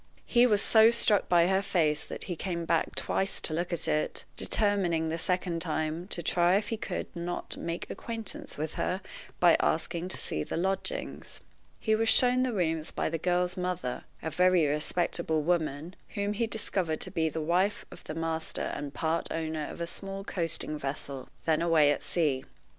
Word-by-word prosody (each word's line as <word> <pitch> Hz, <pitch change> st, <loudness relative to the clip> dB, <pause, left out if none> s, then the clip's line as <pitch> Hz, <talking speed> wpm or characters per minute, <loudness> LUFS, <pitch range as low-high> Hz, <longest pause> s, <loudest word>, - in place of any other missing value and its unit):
He 245 Hz, 0 st, +5 dB
was 210 Hz, -3 st, +2 dB
so 220 Hz, 0 st, +7 dB
struck 230 Hz, -3 st, +3 dB
by 170 Hz, -1 st, +5 dB
her 190 Hz, +2 st, +3 dB
face 160 Hz, -6 st, +1 dB
that -, -, -7 dB
he 180 Hz, -, -4 dB
came 170 Hz, -1 st, -3 dB
back 165 Hz, 0 st, +1 dB
twice 195 Hz, 0 st, 0 dB
to 155 Hz, -, 0 dB
look 175 Hz, +3 st, -1 dB
at 170 Hz, -, -1 dB
it, 155 Hz, -, -1 dB
determining, 185 Hz, -6 st, +1 dB
the 165 Hz, +1 st, -2 dB
second 180 Hz, -1 st, 0 dB
time, 160 Hz, +1 st, -2 dB
to 175 Hz, -4 st, -4 dB
try 175 Hz, +3 st, +3 dB
if 205 Hz, +1 st, 0 dB
he 225 Hz, -, 0 dB
could -, -, -5 dB
not 175 Hz, +1 st, -4 dB
make 170 Hz, 0 st, -4 dB
acquaintance 235 Hz, +6 st, -6 dB
with 155 Hz, +1 st, -3 dB
her 185 Hz, +2 st, -1 dB, 0.4 s
by 175 Hz, -2 st, +7 dB
asking 170 Hz, +2 st, 0 dB
to 185 Hz, -, -1 dB
see 75 Hz, -, -2 dB
the -, -, -4 dB
lodgings. 195 Hz, -, -3 dB, 0.4 s
He 220 Hz, -, +1 dB
was 225 Hz, +1 st, +2 dB
shown 250 Hz, +1 st, +5 dB
the 255 Hz, -1 st, +1 dB
rooms 165 Hz, -6 st, -1 dB
by -, -, -1 dB
the 165 Hz, -, -1 dB
girl's 180 Hz, +1 st, +1 dB
mother, 180 Hz, -8 st, -3 dB, 0.2 s
a 160 Hz, -, -2 dB
very 180 Hz, 0 st, +4 dB
respectable 155 Hz, +1 st, 0 dB
woman, 160 Hz, 0 st, -1 dB, 0.2 s
whom 205 Hz, 0 st, 0 dB
he 230 Hz, +2 st, 0 dB
discovered 185 Hz, -7 st, -2 dB
to -, -, -2 dB
be 160 Hz, -3 st, +1 dB
the 160 Hz, -, -4 dB
wife 180 Hz, +6 st, +1 dB
of -, -, -12 dB
the 155 Hz, -, -5 dB
master 165 Hz, 0 st, -2 dB
and 145 Hz, -1 st, -5 dB
part 160 Hz, +1 st, 0 dB
owner 160 Hz, -2 st, -2 dB
of -, -, -8 dB
a 170 Hz, -, -1 dB
small 195 Hz, +3 st, -6 dB
coasting 165 Hz, -5 st, -3 dB
vessel, 135 Hz, -1 st, -4 dB, 0.2 s
then 160 Hz, -1 st, +2 dB
away 160 Hz, -4 st, +5 dB
at -, -, -1 dB
sea. 145 Hz, -6 st, 0 dB
170 Hz, 185 wpm, -29 LUFS, 160-195 Hz, 0.4 s, so